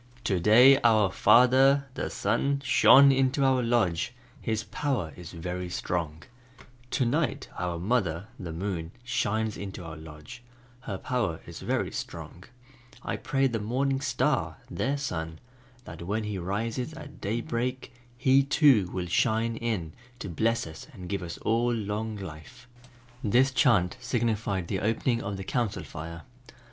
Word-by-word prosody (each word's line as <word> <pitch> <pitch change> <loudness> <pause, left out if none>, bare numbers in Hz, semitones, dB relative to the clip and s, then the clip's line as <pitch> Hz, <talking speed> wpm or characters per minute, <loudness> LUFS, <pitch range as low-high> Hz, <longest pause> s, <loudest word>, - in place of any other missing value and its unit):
"To 95 -3 +1
day 125 +9 +7
our 110 -4 +4
Father 130 +7 +5 0.2
(Sun) 140 0 0
shone 140 +1 +7
into 135 +1 +2
our 130 -1 +3
lodge, 115 -9 +1 0.3
his 110 -1 -1
power 105 - -2
is 90 -2 -10
very 90 +2 -5
strong, 85 -2 -3 0.7
To 130 - +1
night 140 +1 -1
our 90 -1 -2
mother 90 -3 0
(Moon) 85 -1 -4
shines 110 -3 -1
into 95 -2 -7
our 80 -1 -7
lodge, 80 +7 -11 0.4
her 100 -6 -5
power 105 -8 -2
is - - -9
very - - -1
strong, 90 - -7 0.6
I - - -2
pray 135 0 0
the 120 -4 0
Morning 135 +5 0
Star - - 0
(their 140 +2 -1
Son) 80 - -4 0.5
that 80 +1 -9
when 105 +6 -2
he 105 -2 -3
rises 115 - -3
at 145 -3 -11
daybreak, 120 +4 -3 0.2
he 130 +2 +4
too 135 - +4
will 90 -2 -3
shine 115 +5 +1
in 110 -9 -3 0.2
to 125 - -6
bless 115 +7 0
us 80 -1 -10
and 90 -6 -9
give 100 0 -2
us 85 -1 -6
long 110 -2 0
life." 95 +5 -10 0.6
This 125 +5 +3
chant 110 - +3
signified 110 -6 -1
the - - -2
opening 115 +3 0
of 100 0 -4
the 95 - -5
Council 115 0 -2
Fire. 85 +1 -8
110 Hz, 140 wpm, -28 LUFS, 90-125 Hz, 0.7 s, day